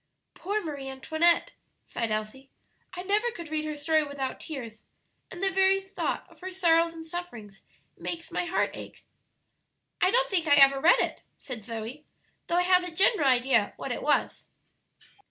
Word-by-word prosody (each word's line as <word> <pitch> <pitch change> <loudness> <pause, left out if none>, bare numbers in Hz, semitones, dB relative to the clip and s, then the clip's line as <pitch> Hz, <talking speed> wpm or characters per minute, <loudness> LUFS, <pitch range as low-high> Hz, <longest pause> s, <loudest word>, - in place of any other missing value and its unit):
"Poor 415 +3 -3
Marie 285 -4 -5
Antoinette!" 315 +6 +1 0.3
sighed 230 -1 -3
Elsie; 215 +5 -4 0.5
"I 360 - -5
never 415 +5 +1
could 340 -9 -9
read 310 0 -2
her 305 -1 -3
story 310 +1 +2
without 280 -3 -4
tears, 235 -8 -8 0.5
and 365 +1 -8
the 385 - +2
very 385 0 +3
thought 385 0 -4
of - - -21
her 375 - -5
sorrows 335 -2 +2
and 325 0 -8
sufferings 275 - -8 0.3
makes 335 -1 -6
my - - -1
heart 345 +2 0
ache." - - -11 1.0
"I 370 - +5
don't - - +1
think 345 -4 +1
I 285 - +6
ever 275 -1 +6
read 345 - +6
it," - - -2 0.2
said 250 -6 -7
Zoe, 230 +6 -6 0.4
"though 340 - 0
I 360 - +4
have 365 0 +4
a 360 - -5
general 335 - +2
idea 250 -4 +2
what - - -5
it - - -3
was." - - 0
320 Hz, 175 wpm, -28 LUFS, 270-360 Hz, 1.0 s, I